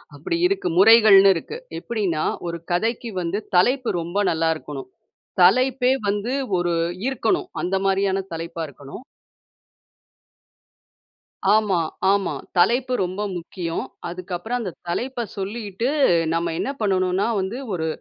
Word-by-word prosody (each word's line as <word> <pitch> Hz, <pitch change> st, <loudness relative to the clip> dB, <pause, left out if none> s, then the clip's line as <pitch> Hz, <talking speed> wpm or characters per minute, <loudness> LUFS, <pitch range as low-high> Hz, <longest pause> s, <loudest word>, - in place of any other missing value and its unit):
அப்படி 345 Hz, -2 st, -2 dB
இருக்கு. 390 Hz, -, -1 dB
முறைகள்னு 200 Hz, -2 st, +8 dB
இருக்கு. 445 Hz, -, -5 dB, 0.2 s
எப்டின்னா, 195 Hz, -9 st, -2 dB, 0.2 s
ஒரு 170 Hz, 0 st, -5 dB
கதைக்கு 225 Hz, +5 st, -1 dB
வந்து, 175 Hz, +5 st, -2 dB, 0.2 s
தலைப்பு 250 Hz, +7 st, +3 dB
ரொம்ப 170 Hz, +4 st, -5 dB
நல்லா 165 Hz, 0 st, +1 dB
இருக்கணும். 140 Hz, -4 st, -8 dB, 0.5 s
தலைப்பே 255 Hz, +6 st, +4 dB, 0.2 s
வந்து, 205 Hz, +5 st, -1 dB, 0.3 s
ஒரு 175 Hz, -1 st, 0 dB, 0.3 s
ஈர்க்கணும். 355 Hz, +7 st, 0 dB
அந்த 180 Hz, +2 st, 0 dB
மாரியான 195 Hz, 0 st, +1 dB
தலைப்பா 165 Hz, 0 st, -5 dB
இருக்கணும். 140 Hz, -, -11 dB, 2.5 s
ஆமா, 210 Hz, -4 st, +3 dB, 0.3 s
ஆமா. 200 Hz, -2 st, +1 dB, 0.2 s
தலைப்பு 245 Hz, +8 st, +3 dB
ரொம்ப 185 Hz, +3 st, -4 dB, 0.2 s
முக்கியம். 170 Hz, -1 st, -4 dB, 0.3 s
அதுக்கு 180 Hz, +1 st, -7 dB
அப்புறம் 235 Hz, +7 st, -3 dB
அந்த 190 Hz, -, -4 dB, 0.2 s
தலைப்ப 240 Hz, +7 st, -2 dB
சொல்லிட்டு, 205 Hz, +3 st, -3 dB, 0.4 s
நம்ம 170 Hz, 0 st, -1 dB
என்ன -, -, -1 dB
பண்ணனுன்னா, 185 Hz, 0 st, +1 dB
வந்து 190 Hz, +5 st, -3 dB, 0.2 s
ஒரு 160 Hz, -3 st, -2 dB
195 Hz, 115 wpm, -22 LUFS, 175-235 Hz, 2.5 s, முறைகள்னு